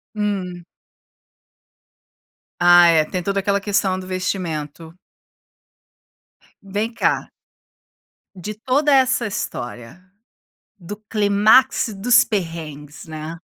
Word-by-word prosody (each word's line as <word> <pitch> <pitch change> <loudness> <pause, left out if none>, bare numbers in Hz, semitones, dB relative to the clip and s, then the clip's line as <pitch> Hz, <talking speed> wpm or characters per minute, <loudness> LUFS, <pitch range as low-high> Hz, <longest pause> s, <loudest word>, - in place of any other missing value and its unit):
Hum. 190 -4 -3 2.0
Ah 175 0 +7
é, 160 -2 +4
tem 180 +1 -4
toda 200 +2 -1
aquela 200 0 0
questão 195 -2 0
do 185 - -8
vestimento. 170 -4 -4 1.7
Vem 205 +4 -3
cá 235 - -1 1.1
de 200 +4 -7
toda 275 +6 +1
essa 260 -2 +2
história, 120 - -6 0.8
do 200 +3 -8
clímax 210 +2 +3
dos 230 +5 +4
perrengues, 160 -6 -6
né? 155 +1 -7
190 Hz, 90 wpm, -20 LUFS, 165-210 Hz, 2.0 s, Ah